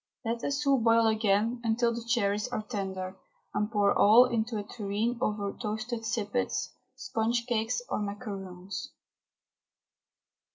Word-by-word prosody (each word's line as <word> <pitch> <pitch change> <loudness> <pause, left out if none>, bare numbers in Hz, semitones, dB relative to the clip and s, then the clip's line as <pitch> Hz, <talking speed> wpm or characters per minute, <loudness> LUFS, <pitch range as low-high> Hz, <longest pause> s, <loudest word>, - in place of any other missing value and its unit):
Let 230 +1 -1
the 270 - -2
soup 275 -2 +2
boil 230 0 +5
again 220 +2 +2
until 235 +1 +2
the 235 0 -5
cherries 210 -2 +1
are 245 -4 -3
tender, 190 -4 -4 0.4
and 210 +1 0
pour 205 -2 +3
all 225 +5 +7
into 230 -2 -1
a 205 - -3
tureen 215 +2 -2
over 210 -4 -1
toasted 225 +1 -4
sippets, 220 +2 -1 0.2
sponge 230 +1 -1
cakes, 235 - 0
or - - -1
macaroons. 200 +1 -6
220 Hz, 130 wpm, -29 LUFS, 205-235 Hz, 0.4 s, all